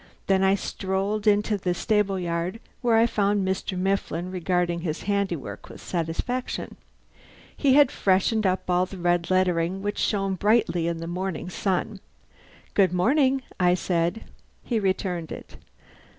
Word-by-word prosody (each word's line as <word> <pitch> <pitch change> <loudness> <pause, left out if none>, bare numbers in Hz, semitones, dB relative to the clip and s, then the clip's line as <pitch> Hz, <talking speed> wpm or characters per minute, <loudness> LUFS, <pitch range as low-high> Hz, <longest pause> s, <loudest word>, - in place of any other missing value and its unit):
Then 195 -1 +2
I 190 +1 +4
strolled 200 +2 -2
into 210 0 +3
the 180 -1 -1
stable 210 -1 +1
yard, 175 +3 -2 0.2
where 240 -3 +3
I 225 - +5
found 205 -3 +1
Mr. 190 0 -2
Mifflin 185 -2 -1
regarding 180 -1 0
his 165 -2 -4
handiwork 200 -6 -2
with - - -11
satisfaction. 180 +10 -3 0.8
He 270 -3 +3
had 290 -2 +6
freshened 200 0 +2
up 185 0 -1
all 180 0 +2
the 195 - -9
red 175 -1 +1
lettering, 185 0 +1
which 205 0 -2
shone 195 -2 0
brilliantly 195 -4 +2
in 170 -1 -1
the 165 - -6
morning 180 0 -4
sunlight. 195 +2 -1 0.7
"Good 190 -3 +3
morning," 265 +7 +2 0.2
I 180 -1 +4
said. 175 +3 -1 0.4
He 235 -3 0
returned 185 -4 -1
it. - - -9
190 Hz, 145 wpm, -25 LUFS, 175-205 Hz, 0.8 s, had